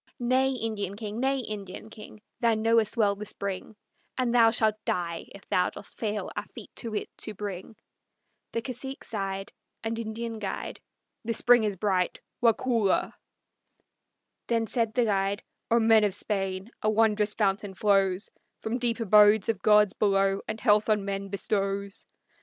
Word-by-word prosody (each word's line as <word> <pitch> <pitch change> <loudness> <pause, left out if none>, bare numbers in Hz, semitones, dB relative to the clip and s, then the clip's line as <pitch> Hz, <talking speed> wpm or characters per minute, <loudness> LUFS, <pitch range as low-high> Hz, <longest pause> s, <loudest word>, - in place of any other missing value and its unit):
"Nay, 260 +1 +2
Indian 215 -5 -3
king; 215 +1 -5
nay, 270 +1 +1
Indian 210 -1 -7
king, 215 -1 -12 0.2
Thou 230 -2 +3
knowest 225 +1 +2
well 205 -3 +3
the 210 +1 -6
spring, 200 +1 -4 0.4
And 250 -2 0
thou 230 -2 +6
shalt 220 -1 +1
die 170 -2 -2
if 200 - -14
thou 180 0 +2
dost - - -9
fail 210 -2 -2
our - - -1
feet - - -9
to 230 -3 -4
it 210 - -4
to 215 - -5
bring." 200 +1 -6 0.8
The 230 - -2
cacique 265 +2 -5
sighed, 195 -2 -4 0.3
And 225 0 -2
Indian 225 0 -4
guide, 195 -2 -5 0.4
"The 230 0 -1
spring 240 -1 +5
is 205 -2 -1
bright, 190 -2 0 0.2
Waukulla!" 230 -3 +2 1.3
Then 230 -1 +1
said 225 -1 -1
the 245 - +3
guide, 200 -1 0 0.3
"O 235 - +4
men 225 -1 +5
of 200 -2 +2
Spain, 195 0 -2
a 215 - +2
wondrous 215 -1 +2
fountain 195 -2 0
flows 195 -1 +2 0.3
From 230 +3 -3
deep 240 -1 0
abodes 210 -1 +5
of 215 -4 0
gods 210 -1 +5
below, 195 -1 +2
and 215 +1 -4
health 210 -1 +3
on 210 -2 +2
men 195 0 -3
bestows. 200 0 -2
215 Hz, 160 wpm, -27 LUFS, 200-230 Hz, 1.3 s, thou